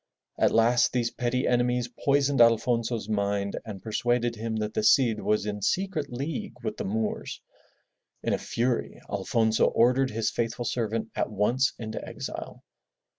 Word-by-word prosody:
At - - +5
last 115 +2 +3
these 120 -2 0
petty 125 +2 -1
enemies 125 0 +1
poisoned 140 +2 +1
Alfonso's 115 -1 +2
mind 100 -1 -1
and 100 -4 -8
persuaded 120 +1 0
him 110 0 -3
that 105 -1 -2
the - - 0
Cid 110 0 +4
was 105 +1 +1
in 105 -1 -4
secret 180 - -1
league 140 +5 -4
with - - -3
the - - -3
Moors. 110 +2 -2 0.8
In - - 0
a - - 0
fury 120 0 -1
Alfonso 110 +2 +1
ordered 125 +3 +3
his 110 0 -1
faithful 115 +1 -2
servant 115 -2 -2
at - - -1
once 115 +6 +1
into 110 -1 -5
exile. - - -7
115 Hz, 150 wpm, -27 LUFS, 110-125 Hz, 0.8 s, At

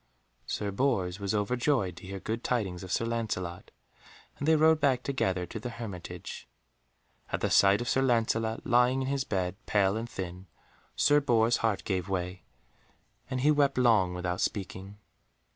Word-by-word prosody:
Sir 100 -1 -2
Bors 100 -6 0
was 100 +1 -1
overjoyed 110 - 0
to 90 - -10
hear 95 0 -5
good 115 +4 -4
tidings 100 -8 -1
of 95 -1 -8
Sir 115 - +1
Lancelot, 110 -7 -3 0.7
and 145 - -2
they 160 - +6
rode 160 0 +5
back 135 -4 +2
together 95 -10 -1
to 110 +6 -7
the 125 - -5
hermitage. 115 -7 -7 0.8
At - - -2
the - - 0
sight 100 +2 +5
of 120 - -4
Sir 130 +2 +2
Lancelot 115 -3 +1
lying 125 +2 +3
in - - -3
his 140 -1 0
bed, 95 -2 -3
pale 100 -1 +2
and 115 +2 -4
thin, 90 -1 -6 0.5
Sir 145 0 +4
Bors' 120 -3 +3
heart 110 -3 0
gave 95 -2 -2
way, 90 -1 -3 0.9
and 130 -1 -2
he 150 +3 +5
wept 145 -2 +2
long 110 -8 +3
without 90 0 -2
speaking. 95 0 -4
110 Hz, 165 wpm, -29 LUFS, 95-125 Hz, 0.9 s, they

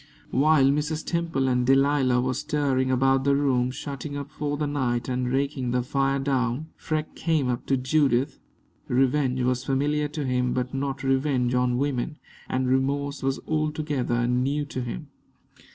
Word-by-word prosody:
While 140 0 +4
Mrs. 150 +2 -1
Temple 165 -6 0
and 125 -1 +2
Delilah 135 -1 +3
were 130 +1 0
stirring 130 -1 0
about 135 +1 +3
the 140 0 +3
room, 130 -3 +2
shutting 140 +1 -6
up 140 0 -6
for 145 -1 -3
the 150 - -1
night 125 -4 -1
and 125 -1 -1
raking 135 -1 -1
the 125 0 +1
fire 135 +2 +1
down, 135 +1 -1
Freke 155 0 -3
came 160 -5 0
up 120 - -3
to 135 - +2
Judith. 135 0 +1 0.5
Revenge 130 0 +1
was 125 0 0
familiar 145 +3 0
to 150 -1 -4
him, 125 -1 0
but 125 0 -2
not 135 0 -3
revenge 135 -2 +1
on 125 -1 +2
women, 140 +2 -1 0.3
and 130 0 0
remorse 140 +2 0
was 135 0 0
altogether 150 -6 0
new 135 +4 0
to 130 -2 -5
him. 125 +5 -6
135 Hz, 160 wpm, -25 LUFS, 125-145 Hz, 0.5 s, While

